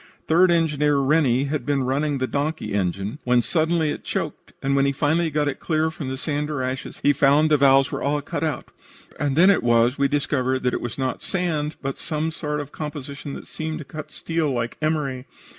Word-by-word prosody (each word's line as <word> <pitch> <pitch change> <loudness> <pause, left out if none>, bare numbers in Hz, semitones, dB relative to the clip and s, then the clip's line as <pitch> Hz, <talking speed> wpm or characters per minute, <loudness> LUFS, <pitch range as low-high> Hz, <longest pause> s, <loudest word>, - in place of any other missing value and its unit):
Third 175 +3 +5
Engineer 150 -4 +2
Rennie 135 -2 +3
had 145 +1 -2
been 140 -2 0
running 140 +3 0
the 130 - 0
donkey 145 +1 -2
engine, 100 - -2
when 125 -1 +3
suddenly 160 0 +1
it - - -6
choked, - - -4
and 135 +1 0
when 140 0 +3
he - - +2
finally 160 +4 +1
got 150 -1 0
it 135 - -2
clear 160 0 0
from 145 -4 -6
the 130 - -3
sand 150 +1 -2
or 145 -4 -2
ashes, 130 +1 -4
he 145 - +5
found 145 +3 +4
the 150 - +6
valves 135 0 +5
were - - -3
all 145 +1 +1
cut - - -3
out, 150 -6 -3 0.5
and 145 -2 0
then 185 +5 +7
it 195 - +2
was 120 +2 +3
we 140 - +4
discovered 130 -2 0
that 125 - +1
it - - -2
was 120 -1 -5
not 130 -1 -2
sand, 160 -5 -1
but 135 0 -3
some 155 0 -2
sort 150 -2 -3
of 145 - -8
a - - -34
composition 145 -2 -6
that - - -9
seemed 155 0 -5
to 155 - -8
cut 155 0 -8
steel 165 -3 -2
like 120 -2 -2
emery. 140 -5 -1
145 Hz, 220 wpm, -23 LUFS, 135-155 Hz, 0.5 s, then